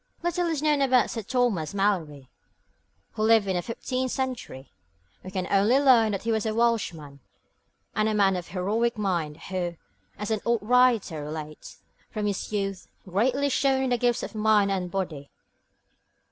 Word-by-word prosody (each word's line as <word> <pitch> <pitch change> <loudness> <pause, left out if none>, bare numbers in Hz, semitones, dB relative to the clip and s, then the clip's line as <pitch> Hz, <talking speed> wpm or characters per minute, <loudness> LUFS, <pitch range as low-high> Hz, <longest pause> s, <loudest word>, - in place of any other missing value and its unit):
Little 345 0 0
is 315 -3 -2
known 300 -2 +2
about 255 -3 +3
Sir 225 - -4
Thomas 210 - 0
Malory, 165 -9 -1 0.8
who - - -6
lived 220 -1 +4
in 190 -1 -1
the 175 - 0
fifteenth 255 +5 -3
century. 250 - -4 0.5
We 185 - -7
only 195 +6 +2
learn 245 -6 +5
that 195 - -3
he 230 - 0
was 220 0 0
a 215 - -2
Welshman, 180 -12 -1 0.8
a 215 0 +1
man 200 -3 +3
of 180 -2 -5
heroic 215 +6 -1
mind 170 -7 -1
who, 175 -2 -2 0.4
as 210 +1 -4
an 215 -2 0
old 235 -3 0
writer 230 -9 +3
relates, 155 0 -8 0.3
'from 215 -2 -3
his 205 0 -3
youth, 195 -3 -3 0.2
greatly 250 +9 +1
shone 265 0 +2
in 260 - 0
the 245 - +3
gifts 240 -1 +1
of - - -6
mind 210 -2 +3
and 185 -2 -2
body.' 170 -7 -4
210 Hz, 160 wpm, -26 LUFS, 185-245 Hz, 0.8 s, learn